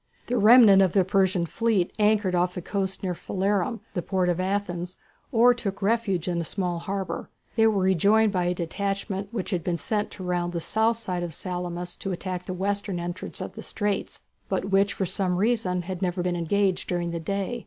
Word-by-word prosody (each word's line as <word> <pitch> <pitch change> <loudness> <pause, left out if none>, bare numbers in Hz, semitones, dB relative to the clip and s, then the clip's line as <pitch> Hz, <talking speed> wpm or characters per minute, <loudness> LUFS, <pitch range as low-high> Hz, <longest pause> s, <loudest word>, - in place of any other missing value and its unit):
The 245 - -1
remnant 215 -3 +8
of 185 -3 +3
the 190 -3 +4
Persian 190 -2 +2
fleet 210 -1 0
anchored 210 -3 +3
off 180 0 +1
the 180 - -4
coast 195 0 -2
near 185 -2 -1
Phalerum, 200 +5 -1
the 175 - -1
port 185 0 0
of 175 0 0
Athens, 185 -2 -2 0.3
or 245 0 +6
took 205 -5 -4
refuge 200 -5 +1
in 175 -1 0
the - - -1
small 175 0 -2
harbour. 195 +1 -4 0.3
They 225 -1 +5
were 205 -4 +2
rejoined 200 +4 +4
by 180 -2 0
a 180 0 0
detachment 195 +3 -3
which 215 -4 -4
had 175 -4 -1
been 175 -2 -1
sent 210 +3 -1
to 190 - -8
round 175 -1 -1
the 170 - -1
south 220 +6 +1
side 185 -6 -3
of 170 -3 -4
Salamis 175 -1 -4
to 195 - -4
attack 180 0 -4
the 185 - -3
western 200 0 -1
entrance 175 +1 -5
of - - -5
the - - -8
straits, 205 -2 -3 0.3
but 190 - -1
which 195 +1 +3
for 190 - -1
some 180 0 0
reason 195 -4 +1
had 185 +1 -5
never 180 -1 -1
been 180 -1 0
engaged 185 +2 0
during 175 -1 -1
the 170 - -3
day. 200 +7 -2
190 Hz, 205 wpm, -26 LUFS, 180-205 Hz, 0.3 s, remnant